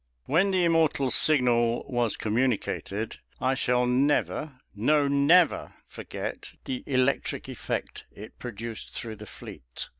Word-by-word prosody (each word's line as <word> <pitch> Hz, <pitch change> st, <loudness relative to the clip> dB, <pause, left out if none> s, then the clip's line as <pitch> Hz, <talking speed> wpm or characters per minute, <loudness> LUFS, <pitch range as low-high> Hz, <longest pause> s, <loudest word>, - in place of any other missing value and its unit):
When 185 Hz, +6 st, +3 dB
the 185 Hz, -2 st, +2 dB
immortal 160 Hz, -5 st, +2 dB
signal 120 Hz, -5 st, +3 dB
was 120 Hz, -4 st, 0 dB
communicated, 110 Hz, -2 st, -1 dB, 0.2 s
I 130 Hz, +1 st, +1 dB
shall 125 Hz, -1 st, +1 dB
never, 140 Hz, +2 st, 0 dB, 0.2 s
no, 145 Hz, +7 st, +3 dB
never, 145 Hz, +5 st, +3 dB
forget -, -, -7 dB
the 130 Hz, -1 st, -3 dB
electric 130 Hz, 0 st, 0 dB
effect -, -, -5 dB
it 105 Hz, -, -12 dB
produced 115 Hz, -1 st, -6 dB
through 110 Hz, -2 st, -6 dB
the 105 Hz, 0 st, -10 dB
fleet. -, -, -9 dB
125 Hz, 120 wpm, -27 LUFS, 115-145 Hz, 0.2 s, When